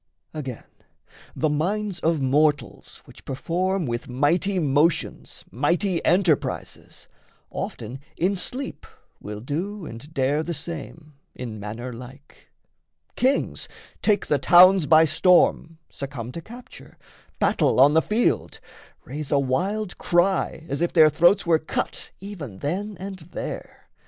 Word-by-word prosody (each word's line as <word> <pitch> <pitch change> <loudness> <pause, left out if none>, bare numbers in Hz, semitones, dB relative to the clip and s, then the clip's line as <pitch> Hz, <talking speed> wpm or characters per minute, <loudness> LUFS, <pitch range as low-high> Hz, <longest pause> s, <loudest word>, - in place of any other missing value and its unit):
Again, 135 -6 -6 0.7
the 155 - +1
minds 185 +6 -1
of 160 0 +1
mortals 145 +3 0
which - - -16
perform 180 +6 -1
With 120 -1 -4
mighty 165 +10 +1
motions 150 0 0
mighty 170 - 0
enterprises, 175 -4 0 0.4
Often 120 +4 -6 0.2
in 190 +4 +1
sleep 255 +9 -4 0.3
will 105 0 -7
do 175 - -4
and 135 +4 -10
dare 145 0 +1
the 170 +1 -4
same 155 0 -8 0.2
In 115 -4 -6
manner 115 +5 -6
like. 130 +4 -13 0.7
Kings 265 +3 0 0.3
take 210 -2 +2
the 145 - +1
towns 180 +2 +7
by 160 0 +7
storm, 165 0 +3
Succumb 135 -4 -6
to 165 - -7
capture, 240 +7 -13 0.4
battle - - +2
on 140 +3 +7
the 160 - +5
field, 220 +7 0 0.5
Raise 145 +2 -6
a 145 - +4
wild 180 +10 -1
cry 175 -2 +1
as 140 +3 -3
if 175 - +1
their 155 -3 +6
throats 175 +5 +4
were 165 -2 +3
cut 155 - -4
Even 175 - -8
then 190 - -3
and 190 0 -7
there. 165 +1 -8
160 Hz, 125 wpm, -24 LUFS, 140-185 Hz, 0.7 s, towns